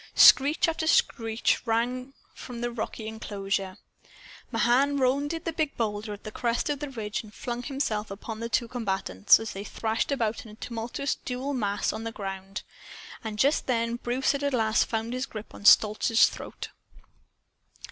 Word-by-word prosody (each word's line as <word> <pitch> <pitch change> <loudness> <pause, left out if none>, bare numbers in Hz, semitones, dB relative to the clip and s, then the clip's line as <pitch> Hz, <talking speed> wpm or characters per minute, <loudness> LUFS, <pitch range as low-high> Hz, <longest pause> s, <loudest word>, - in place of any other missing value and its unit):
Screech 285 +5 +7
after 325 -1 -1
screech 225 -8 +2
rang 250 +4 -1 0.2
from 240 -2 -8
the 240 0 -1
rocky 220 -1 -5
enclosure. 195 -3 -3 0.7
Mahan 255 +5 +3
rounded 280 +5 0
the 330 - -2
big 305 -3 -1
boulder 210 -1 -2
at 205 - -8
the 215 - -6
crest 240 +5 0
of 285 - -2
the 295 -1 -4
ridge 215 -5 -4
and 215 - -14
flung 240 +2 -4
himself 240 -6 -2
upon 215 +2 -7
the 230 0 -4
two 235 +2 +1
combatants, 195 - +3
as 225 -1 -5
they 195 - -5
thrashed 220 +4 -2
about 230 -5 -1
in 225 - -12
a 210 - -12
tumultuous 235 +4 -3
dual 260 +3 -3
mass 205 -5 0
on 220 - -5
the 230 - -3
ground. 195 -1 -6 0.6
And 220 -2 -5
just 280 +7 +2
then 230 -1 0
Bruce 245 +3 0
at 280 0 -1
last 220 -1 +3
found 225 +1 -2
his 255 +1 -2
grip 215 -1 -9
on 205 - -11
Stolz's 215 +2 +6
throat. - - -8
230 Hz, 165 wpm, -27 LUFS, 215-260 Hz, 0.7 s, Screech